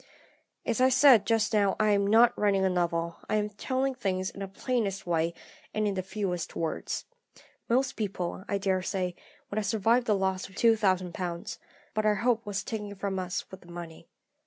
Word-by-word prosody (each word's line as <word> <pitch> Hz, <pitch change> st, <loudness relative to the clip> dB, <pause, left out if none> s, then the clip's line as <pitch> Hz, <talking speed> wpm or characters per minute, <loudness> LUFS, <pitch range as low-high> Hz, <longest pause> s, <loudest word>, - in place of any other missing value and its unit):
"As 230 Hz, +1 st, 0 dB
I 260 Hz, -, +6 dB
said 255 Hz, -5 st, +6 dB
just 225 Hz, -1 st, +2 dB
now, 200 Hz, -2 st, +3 dB
I 215 Hz, -1 st, +4 dB
am 200 Hz, -1 st, +2 dB
not 230 Hz, +3 st, +6 dB
writing 195 Hz, -2 st, +2 dB
a 190 Hz, -, +2 dB
novel; 170 Hz, -1 st, -1 dB
I -, -, +1 dB
am 210 Hz, 0 st, +1 dB
telling 260 Hz, +6 st, -1 dB
things 190 Hz, -5 st, -2 dB
in -, -, -11 dB
the 195 Hz, -, -4 dB
plainest 200 Hz, -1 st, -2 dB
way, 165 Hz, -1 st, +1 dB, 0.4 s
and 215 Hz, 0 st, +1 dB
in 200 Hz, -, 0 dB
the 190 Hz, -, -1 dB
fewest 190 Hz, -3 st, -3 dB
words. 165 Hz, -1 st, -3 dB, 0.6 s
Most 260 Hz, +2 st, +2 dB
people, 190 Hz, -4 st, -3 dB
I 200 Hz, -, +1 dB
daresay, 185 Hz, -1 st, -1 dB, 0.4 s
would 200 Hz, -, -3 dB
have 210 Hz, -, -2 dB
survived 225 Hz, +4 st, +2 dB
the 210 Hz, -, +4 dB
loss 190 Hz, 0 st, -1 dB
of 190 Hz, -, -17 dB
£2000, 185 Hz, -6 st, +1 dB, 0.3 s
but 215 Hz, -1 st, 0 dB
our 210 Hz, -, +4 dB
hope 230 Hz, +1 st, +1 dB
was 200 Hz, -1 st, -2 dB
taken 210 Hz, -2 st, -5 dB
from 195 Hz, -1 st, -2 dB
us 180 Hz, -1 st, -3 dB
with 190 Hz, -, -10 dB
the 175 Hz, -, -14 dB
money. 170 Hz, -1 st, -9 dB
200 Hz, 185 wpm, -29 LUFS, 185-220 Hz, 0.6 s, I